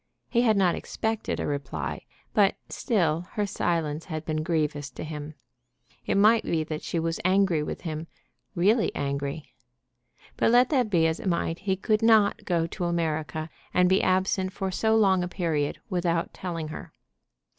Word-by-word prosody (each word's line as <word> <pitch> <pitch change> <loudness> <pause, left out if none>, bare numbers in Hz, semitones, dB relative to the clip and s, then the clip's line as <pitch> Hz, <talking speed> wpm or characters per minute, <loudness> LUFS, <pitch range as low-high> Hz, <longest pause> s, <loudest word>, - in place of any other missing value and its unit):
He 235 - +3
had 220 -4 +3
not 185 -3 +3
expected 220 0 -3
a - - -2
reply; 130 - -4 0.3
but 200 -1 +4
still 175 - 0
her 210 - 0
silence 165 -5 -1
had 155 -2 -5
been 155 -1 -1
grievous 155 -3 -1
to - - -8
him. 150 -1 -6 0.7
It - - +1
might 220 +3 +5
be 160 -2 0
that 155 -1 -5
she - - -3
was 165 0 -1
angry 185 -3 +3
with 150 - -5
him, 160 -1 -5 0.5
really 210 +6 +3
angry. 140 +1 -3 0.8
But - - +3
let 245 +2 +5
that 255 -6 +2
be 170 -5 +3
as 160 0 0
it - - -5
might, 170 -1 -1
he 190 -1 0
could 215 +3 0
not 220 -3 +4
go 170 -2 +1
to 175 +2 -4
America, 160 -2 -2 0.2
and 180 0 +5
be 190 +1 +3
absent 185 0 +1
for 190 0 -3
so 220 +4 +2
long 195 -4 +4
a 180 - -1
period, 160 -5 -1
without 170 -2 0
telling 165 -4 -5
her. 155 - -8
170 Hz, 170 wpm, -26 LUFS, 155-195 Hz, 0.8 s, might